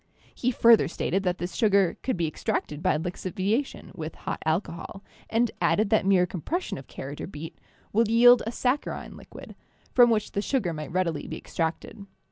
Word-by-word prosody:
He 250 - -1
further 235 -2 +5
stated 195 - -1
that 180 0 0
this 175 +2 -5
sugar 200 -5 +3
could 255 - -1
be 170 - 0
ex 155 - -7
tracted 150 0 -2
by 185 -4 +2
lixiviation 185 - -3
with 155 -1 -6
hot - - -5
alcohol, 170 +3 -3 0.3
and 230 0 +1
added 210 -1 +2
that 215 -3 +3
mere 185 -2 +5
compression 190 - -4
of 135 - -13
carrot 140 +2 -7
or - - -5
beet 160 -3 -9 0.3
would 225 +2 +3
yield 240 +2 +7
a - - -1
sac 255 +4 +1
charine - - -6
liquid, - - -12 0.4
from 245 -1 +7
which 215 -2 0
the 200 - -1
sugar 210 -7 -1
might 155 0 -6
readily 170 -3 -1
be - - -5
extracted. 175 +5 -4
195 Hz, 185 wpm, -26 LUFS, 165-230 Hz, 0.4 s, yield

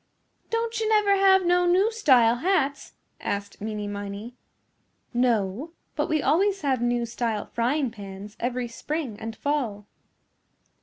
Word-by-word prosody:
"Don't 460 0 -1
you 440 -1 0
never 420 -2 +4
have 385 -1 +5
no 355 0 +3
new 380 +5 +4
style 250 - +4
hats?" 280 -3 0 0.3
asked 200 0 -4
Meeney 210 -1 -3
Miney. 205 +3 -6 0.8
"No, 240 - 0 0.2
but - - -1
we 310 -2 +1
always 390 +4 +2
have 265 -5 0
new 240 0 +1
style 230 -2 -2
frying 255 +2 0
pans 200 -1 -9
every 245 0 -2
spring 250 -1 -4
and 225 0 -6
fall." 240 -9 -2
250 Hz, 135 wpm, -26 LUFS, 220-350 Hz, 0.8 s, have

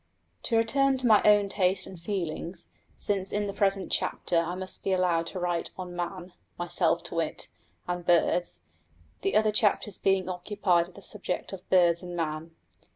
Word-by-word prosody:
To 230 - +2
return 270 +4 +3
to 255 - -3
my 215 -3 +6
own 205 -1 +5
taste 190 -1 +1
and 185 - -10
feelings, 175 - -4 0.3
since 195 -2 -2
in 210 0 0
the 200 - -4
present 195 -1 0
chapter - - -1
I 170 +1 +1
must 185 0 -6
be 195 - +1
allowed 175 -3 +1
to 185 - -5
write 175 -1 0
on 180 -1 -6
Man 175 +1 -5 0.2
(myself 170 -1 0
to 175 - -6
wit) 165 -2 -2 0.4
and 175 0 -3
Birds, 175 - +2 0.6
the 195 - 0
other 215 0 +4
chapters 210 -2 +1
being 190 -2 +2
occupied 180 -1 +1
with 180 - -18
the 200 - -11
subject 195 -1 -3
of 185 -2 -9
Birds 170 -2 +4
and 175 -1 -7
Man. 160 0 -4
185 Hz, 175 wpm, -28 LUFS, 175-200 Hz, 0.6 s, my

